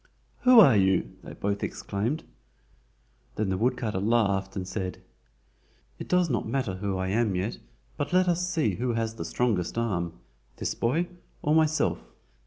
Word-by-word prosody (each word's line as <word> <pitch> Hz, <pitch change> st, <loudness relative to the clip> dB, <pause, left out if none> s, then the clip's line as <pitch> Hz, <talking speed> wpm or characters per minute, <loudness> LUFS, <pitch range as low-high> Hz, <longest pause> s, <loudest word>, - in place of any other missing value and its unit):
"Who 250 Hz, -2 st, +7 dB
are 140 Hz, -, +8 dB
you?" 95 Hz, -2 st, +2 dB
they -, -, -9 dB
both 100 Hz, 0 st, -2 dB
exclaimed. 115 Hz, +10 st, -2 dB, 1.1 s
Then 105 Hz, -2 st, -1 dB
the 95 Hz, -, 0 dB
woodcutter 115 Hz, -4 st, 0 dB
laughed 100 Hz, -3 st, +1 dB
and 95 Hz, -2 st, -4 dB
said: 95 Hz, -1 st, -4 dB, 1.0 s
"It -, -, -6 dB
does 180 Hz, -1 st, +3 dB
not 120 Hz, -7 st, -1 dB
matter 120 Hz, -7 st, -1 dB
who 95 Hz, 0 st, -2 dB
I 95 Hz, 0 st, -2 dB
am 105 Hz, -1 st, +1 dB
yet, 95 Hz, +5 st, -2 dB, 0.4 s
but -, -, -2 dB
let 185 Hz, 0 st, +3 dB
us 180 Hz, +1 st, +1 dB
see 155 Hz, -, 0 dB
who 120 Hz, +1 st, -1 dB
has 115 Hz, -1 st, -1 dB
the 115 Hz, -, -6 dB
strongest 110 Hz, -6 st, -1 dB
arm—this 85 Hz, -, -4 dB
boy 155 Hz, +9 st, 0 dB, 0.4 s
or 150 Hz, -, +2 dB
myself?" 160 Hz, 0 st, +2 dB
110 Hz, 155 wpm, -27 LUFS, 95-135 Hz, 1.1 s, are